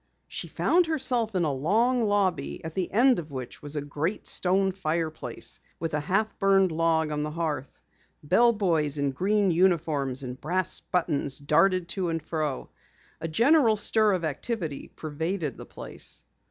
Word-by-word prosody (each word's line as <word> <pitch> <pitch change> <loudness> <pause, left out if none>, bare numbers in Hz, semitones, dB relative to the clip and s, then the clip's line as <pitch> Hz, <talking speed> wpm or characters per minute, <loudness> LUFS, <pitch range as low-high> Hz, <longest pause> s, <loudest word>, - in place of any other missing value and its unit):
She - - -5
found 350 0 +2
herself 250 -8 0
in 180 - +2
a 150 -3 0
long 225 - +2
lobby 190 -8 0
at 160 - -5
the 185 -1 -2
end 245 +3 +4
of 160 -2 -7
which 130 -3 -7
was 145 0 -2
a 145 - -2
great 150 +7 -3
stone 190 +1 +3
fireplace 160 -3 -2 0.2
with 165 -1 -3
a 150 - +1
half 195 +8 -1
burned 195 -2 +4
log 160 -1 +1
on 150 0 -1
the 150 - -2
hearth. 150 -4 -4 0.4
Bellboys 175 -5 +2
in 140 -1 0
green 195 +6 +1
uniforms 155 -7 +1
and 125 0 -7
brass 180 +4 -1
buttons 145 -6 -1
darted 170 +5 +2
to 185 -3 -1
and 165 0 -1
fro. 155 -3 -3 0.5
A 165 - -3
general 235 - +4
stir 210 0 +3
of 175 -3 -1
activity 160 - -3
pervaded 160 -1 -4
the - - -10
place. - - -4
170 Hz, 160 wpm, -27 LUFS, 150-200 Hz, 0.5 s, end